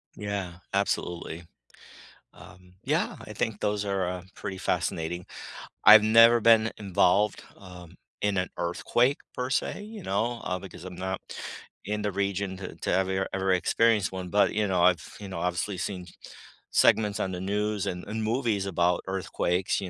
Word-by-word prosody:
Yeah, 100 -4 -4
absolutely. 90 -4 -2 0.9
Um, 90 -1 -16
yeah. - - 0
I - - -9
think 110 -2 -2
those 105 0 -1
are, 95 -2 0
uh, 90 -1 -5
pretty 95 - -5
fascinating. 90 -2 -2 0.6
I've 105 +1 +10
never 115 +2 +7
been 115 0 +5
involved, 100 0 +2
um, 90 -2 -13 0.2
in 100 -1 0
an 90 -1 0
earthquake 120 +10 +1 0.2
per 125 0 -2
se, 145 - -1
you 215 -1 -9
know, 115 - -1
uh, 90 - -2
because 90 -2 -11
I'm 90 -1 -8
not 95 0 -3 0.6
in 105 +1 -2
the 105 -1 -1
region 100 -1 -2
to 95 - -7
to - - -3
ever- 95 0 +1
ever 95 0 +1
experience 105 +3 +2
one, 95 -1 -5
but, 105 +2 +3
you 105 0 +1
know, 90 -2 +2
I've 90 -3 +2
you 100 - -7
know, 95 -3 -5
obviously 90 +3 -2
seen 90 0 -4 0.6
segments 105 -2 +3
on 95 - -1
the 90 - -5
news 105 +1 -1
and 90 -1 -4
and 110 +1 -3
movies 110 -4 0
about 90 -1 +1
earthquakes, 95 0 -1
you 95 - -5
95 Hz, 165 wpm, -27 LUFS, 90-105 Hz, 0.9 s, I've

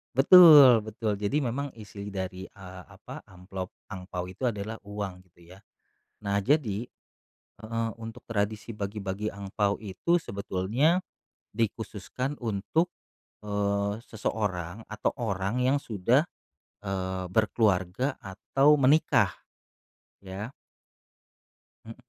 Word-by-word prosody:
Betul 140 - +9
betul. 110 -1 -2
Jadi 105 +9 0
memang 140 +1 -2
isi 105 -2 -9
dari, 95 -1 -5
eee, 95 -2 -11
apa, - - -10
amplop 95 0 -8 0.2
angpao 90 -2 -6
itu 95 +8 -10
adalah 110 -2 -2
uang, 100 -3 -6
gitu 85 +1 -17
ya. - - -17 0.6
Nah, 100 -1 0
jadi 120 -2 +1 0.7
heeh, 115 +1 -2
untuk 115 0 -9
tradisi 105 0 -2
bagi-bagi 100 0 -4
angpao 100 +1 -2
itu 110 - 0
sebetulnya 105 - 0 0.5
dikhususkan 115 +4 -3
untuk, 115 - 0 0.6
eee, 100 +1 -1
seseorang 105 -3 -3
atau 110 0 -1
orang 100 +1 -1
yang 130 +3 +3
sudah, 115 - +2 0.6
eee, 95 -2 -3
berkeluarga 105 +3 +1
atau 135 +9 +2
menikah, 140 +4 +4 0.9
ya. 100 +6 -6 1.3
Hmm. 115 - -8
105 Hz, 105 wpm, -28 LUFS, 95-115 Hz, 1.3 s, Betul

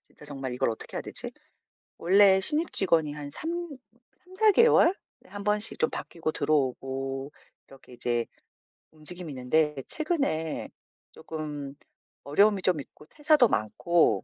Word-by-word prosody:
진짜 - - -18
정말 135 -3 -3
이걸 125 - +1
어떻게 110 - -7
해야 - - -3
되지? - - 0 0.7
원래 190 +2 +5
신입 310 - -1
직원이 165 -6 +2
한 145 -1 -7
3 315 - -6 0.8
3-4 385 +4 +3
개월에 465 -4 +5 0.3
1 205 0 -8
번씩 210 +1 -1
좀 - - +2
바뀌고 165 -2 -4
들어오고 135 -2 -1 0.4
이렇게 135 -2 -16
이제 120 -1 -1 0.7
움직임이 160 +2 -7
있는데 150 +4 +1
최근에 275 - -2 0.4
쪼끔 150 -3 -7 0.5
어려움이 200 +7 +3
좀 180 -4 +1
있고 145 - -12
퇴사도 295 - +4
많고 165 +11 +1
155 Hz, 265 characters per minute, -27 LUFS, 140-205 Hz, 0.8 s, 원래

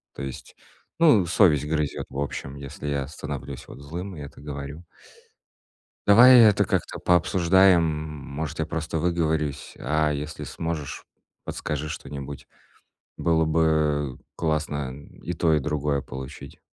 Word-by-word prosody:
То - - -7
есть, 65 -2 -8 0.4
ну, 130 - +6
совесть 80 -5 +4
грызет 75 -2 -1
в - - -8
общем, 70 -1 -4
если 70 +1 -7
я 70 -2 -1
становлюсь 70 -3 -7
вот - - -11
злым 90 +6 -6
и 75 - -8
это 70 - -10
говорю. 70 +2 -7 1.2
Давай 120 +5 +9
это 105 -3 +6
как-то - - -2
пообсуждаем. 90 +1 +4
Может, 75 -1 -4
я 80 - 0
просто 80 0 -3
выговорюсь. 80 -4 -1
А 75 0 +1
если 75 +1 -4
сможешь, 80 -4 -5 0.4
подскажи 75 +1 -4
что-нибудь. 70 -3 -7 0.7
Было 80 -1 +2
бы 75 -4 +1 0.2
классно 75 -4 -1 0.3
и 90 - -3
то, 80 -1 +1
и - - +4
другое 75 -1 -1
получить. 65 +3 -9
75 Hz, 130 wpm, -25 LUFS, 70-85 Hz, 1.2 s, Давай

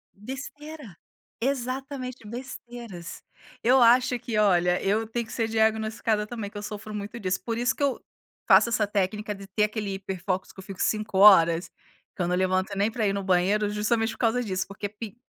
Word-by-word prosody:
Besteira, 270 - -9 0.4
exatamente, 255 -2 -3
besteiras. 235 -6 -8 0.4
Eu 255 +2 +5
acho 250 +1 +5
que 225 -2 -3
olha, 180 -4 +3
eu 215 +3 +1
tenho 235 +1 -3
que - - -13
ser 225 -2 -1
diagnosticada 220 -1 +1
também, 220 -4 -5
que 205 - -10
eu - - -5
sofro 210 0 -7
muito 210 +3 -5
disso. 190 -2 -1
Por 230 -1 -2
isso, 245 +1 +1
que - - -3
eu 275 -2 0 0.5
faço 235 - +6
essa 215 -2 +1
técnica 210 +1 -1
de 195 0 -11
ter 205 +2 0
aquele 210 -1 -2
hiper 190 -1 -6
focos 185 -1 -2
que - - -15
eu 190 - -8
fico 195 -2 -8
5 215 -2 0
horas. 170 -4 +7 0.5
Que 185 - -2
eu 175 - 0
não 180 - +1
levanto 185 +1 0
nem 205 +3 +1
pra 220 -2 0
ir 195 - +1
no 200 - -2
banheiro, 190 +3 +2
justamente 225 +2 0
por - - -13
causa 245 +1 +2
disso. 190 -4 -2
Porque 200 +1 -5
pix 215 +1 -9
215 Hz, 195 wpm, -26 LUFS, 195-235 Hz, 0.5 s, horas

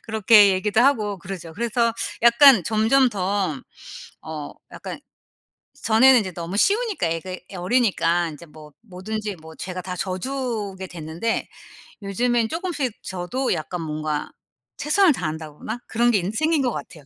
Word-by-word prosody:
그렇게 215 -2 +5
얘기도 205 +4 +1
하고 215 -7 +2
그러죠. 175 -2 -8
그래서 235 +4 0 0.3
약간 235 -2 +7
점점 225 +6 +3
더 190 - -2 0.6
어 155 -2 -7 0.2
약간 - - -8 0.8
전에는 245 +3 +6
이제 190 -3 -4
너무 175 +3 -5
쉬우니까 410 - +1
애가 165 +3 -4 0.2
어리니까 180 -4 +1
인제 155 +2 -11
뭐 150 -1 -14
뭐든지 210 0 -5
뭐 160 0 -13
제가 185 0 -6
다 180 0 -6
져주게 200 0 -4
됐는데 170 +6 -3 0.5
요즘엔 225 +3 0
쪼금씩 325 - -3
저도 190 +9 -2
약간 170 +3 -4
뭔가 155 -1 -3 0.5
최선을 335 +3 +3
다한다거나 160 - -5
그런 240 +2 +2
게 215 - +3
인제 195 +5 -4
생긴 315 -1 +2
것 250 -2 0
같아요. 155 -5 -9
205 Hz, 305 characters per minute, -23 LUFS, 175-240 Hz, 0.8 s, 약간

